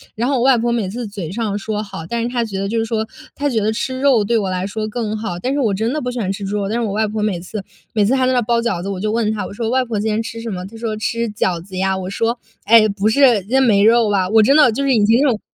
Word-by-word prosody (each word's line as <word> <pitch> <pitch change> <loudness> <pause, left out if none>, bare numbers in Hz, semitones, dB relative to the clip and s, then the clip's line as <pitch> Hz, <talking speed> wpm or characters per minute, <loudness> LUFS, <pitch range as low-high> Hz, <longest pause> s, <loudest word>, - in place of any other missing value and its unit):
然 235 +3 -1
后 275 -1 +1
我 - - 0
外 260 0 +5
婆 235 +1 0
每 225 -5 -1
次 235 +4 -5
嘴 200 -6 -6
上 215 -1 -2
说 210 +1 -3
“好”， 195 -3 -8
但 235 -1 -1
是 - - -1
她 240 -1 -1
觉 210 -4 -5
得 195 - -2
就 225 +3 -1
是 225 - 0
说 220 -1 -2 0.3
她 290 - -1
觉 240 -6 0
得 215 +1 +1
吃 260 +4 -3
肉 265 -6 +4
对 235 +4 0
我 195 -3 -2
来 185 0 -2
说 215 +2 -3
更 220 -1 -3
好， 215 -5 -4
但 255 +10 -2
是 290 - 0
我 230 -7 +1
真 220 +5 -1
的 305 - -2
不 250 - -3
喜 250 0 -4
欢 195 -4 -1
吃 200 +1 -5
猪 200 +2 -2
肉， 200 -1 -2
但 225 +4 -1
是 - - -1
我 215 - -2
外 215 +1 +1
婆 215 +1 -3
每 210 -4 -1
次 195 +3 -6 0.3
每 215 - +2
次 230 +6 +2
还 260 -1 +2
在 255 - +2
那 250 - +2
包 235 +1 +1
饺 230 -7 -1
子， 195 - -5
我 195 -2 -4
就 210 +2 -1
问 220 -1 +1
她， 210 -3 -3
我 - - -8
说： 225 +2 -3
“外 255 +1 +1
婆 225 -3 -3
今 220 +2 -1
天 215 +1 0
吃 230 0 -7
什 230 - -5
么？” 180 -3 -5
她 205 +4 -11
说： 225 -2 -3
“吃 230 +2 -2
饺 185 -5 -1
子 185 +1 -9
呀。” 190 0 +1
我 185 -1 -5
说： 230 +4 -1 0.3
“哎， 220 +1 +6
不 200 +1 -1
是， 240 -2 +4
今 195 - -18
天 265 +2 +3
没 205 -5 +4
肉 225 0 +4
吧？” 195 -3 +1
我 220 0 +6
真 270 +7 +4
的 295 -6 +6
就 225 - -3
是 275 - +2
已 220 -4 +3
经 225 +3 +4
这 290 - +4
种 230 -5 +1
220 Hz, 365 characters per minute, -18 LUFS, 200-235 Hz, 0.3 s, 哎